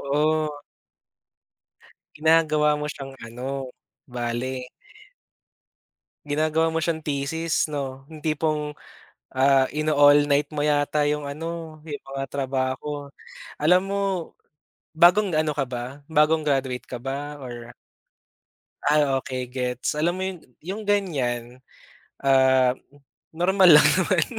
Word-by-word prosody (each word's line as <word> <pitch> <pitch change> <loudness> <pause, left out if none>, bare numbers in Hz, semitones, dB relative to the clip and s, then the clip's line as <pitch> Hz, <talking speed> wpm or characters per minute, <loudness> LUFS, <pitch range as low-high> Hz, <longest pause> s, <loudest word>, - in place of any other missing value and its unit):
Oo. 155 -1 0 1.5
Ginagawa 155 -1 +3
mo 150 - -3
siyang 135 -2 -9
ano, 130 +2 -5 0.3
bale 125 +1 -4 1.6
Ginagawa 155 +2 +1
mo 165 - 0
siyang 160 -1 -2
thesis, 150 +3 -1
'no. 135 -2 -5
Yung 155 -2 -12
tipong, 155 -1 -1 0.6
ah, 135 0 +4
ino-all 145 -1 +4
night 145 +1 +2
mo 150 - -3
yata 145 0 +1
yung 150 0 -1
ano, 160 +2 -6
yung 145 -2 -6
mga 135 0 -3
trabaho. 135 +2 -3 0.5
Alam 180 +5 +4
mo, 200 0 -1 1.0
bagong 180 +1 +5
ano 155 -1 +1
ka 145 - 0
ba, 125 +3 -6
bagong 155 +1 +3
graduate 135 -3 -1
ka 125 - -5
ba 140 +4 -5
or 120 -3 -9 1.1
Ay, 150 +1 +4 0.2
okey 130 -2 -4
gets. 125 +2 -3
Alam 170 +3 +1
mo - - -2
'yon, 190 -2 -5 0.2
yung 195 +6 -6
ganyan, 130 -11 -1 0.6
ah, 130 -2 +4 0.6
normal 185 +3 +4
lang 145 - +5
naman. 180 -3 +2
145 Hz, 115 wpm, -24 LUFS, 130-155 Hz, 1.6 s, bagong